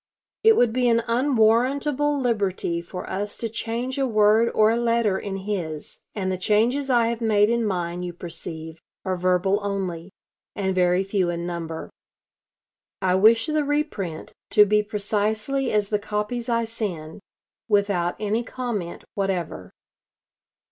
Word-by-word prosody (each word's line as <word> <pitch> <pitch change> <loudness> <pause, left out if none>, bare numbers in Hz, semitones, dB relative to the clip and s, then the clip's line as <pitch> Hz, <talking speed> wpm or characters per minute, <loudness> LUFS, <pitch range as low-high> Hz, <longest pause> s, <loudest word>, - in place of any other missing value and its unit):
It 445 0 +7
would 235 -2 +3
be 250 0 +2
an 230 0 +3
unwarrantable 265 +4 +2
liberty 200 -8 -1
for 180 +1 -8
us 205 +2 -3
to 230 - -2
change 235 +4 -3
a 270 - +2
word 215 +1 +4
or 215 0 +5
a - - +2
letter 230 -4 +1
in 200 -2 -5
his, 165 -7 -3 0.2
and 190 -3 -1
the 185 - -3
changes 235 +8 +1
I 240 -2 +4
have 235 0 -3
made 215 -1 +3
in 235 0 +1
mine, 175 -4 -2
you 180 -1 -4
perceive, 165 -2 -7 0.2
are 190 -1 0
verbal 185 +2 +1
only, 190 -4 -3 0.5
and 190 -2 -1
very 180 0 +2
few 195 -2 0
in 170 0 -3
number. 165 -2 -5 1.1
I 185 -1 +1
wish 220 +4 +5
the 305 -1 0
reprint 285 - -3 0.2
to 210 - +6
be 210 +1 +3
precisely 215 +5 -1
as 210 -1 +1
the 210 - +1
copies 210 +4 -3
I 230 -1 +1
send, 185 -9 -5 0.5
without 200 -5 +1
any 215 +3 0
comment 230 -9 -4
whatever." 180 - -3
210 Hz, 150 wpm, -24 LUFS, 185-235 Hz, 1.1 s, It